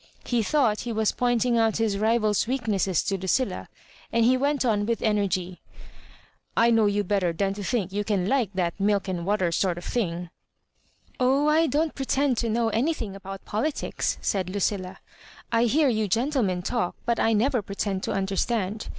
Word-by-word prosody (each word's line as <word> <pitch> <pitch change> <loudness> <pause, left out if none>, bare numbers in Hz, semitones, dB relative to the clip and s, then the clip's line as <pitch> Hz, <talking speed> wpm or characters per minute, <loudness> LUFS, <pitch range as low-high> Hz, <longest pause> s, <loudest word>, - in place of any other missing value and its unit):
He 240 -2 +1
thought 225 -3 +2
he 240 - -4
was 220 -1 +1
pointing 245 -1 +1
out 225 -2 +2
his 215 -3 0
rival's 215 -1 +2
weakness 215 -8 0
to 195 -1 -2
Lucilla, 190 +8 -1 0.4
and 230 -1 +3
he 255 +2 +5
went 280 +1 0
on 210 -3 +1
with 230 -1 -1
energy 195 -4 0 0.3
— - - -24
*' - - -43
I 235 +1 +5
know 225 -2 +4
you 205 0 +1
better 190 -3 +1
than 195 +3 -1
to 205 0 -6
think 200 -4 -1
you 205 +1 -1
can 195 -3 0
like 260 -3 +1
that 175 0 -1
milk 200 0 +1
and 180 -2 -3
water 195 -4 +1
sort 175 0 0
of 175 - -7
thing." 175 -7 -2 0.4
" - - -36
Oh, 270 +3 +3
I 320 +2 +4
don't 310 +2 0
pretend 270 -1 0
to 230 - -1
know 225 +1 +1
anything 230 -3 -1
about 195 0 -9
politics," 250 +9 -2
said 190 -2 -1
Lucilla. 190 -1 -2 0.5
I 230 0 +3
hear 290 +6 +3
you 220 -4 +1
gentlemen 225 -4 0
talk, 235 -4 -1
but 235 -1 0
I 225 - +3
never 245 +3 +2
pretend 200 -1 -3
to - - -2
understand. 195 +2 -1
215 Hz, 185 wpm, -25 LUFS, 195-240 Hz, 0.5 s, he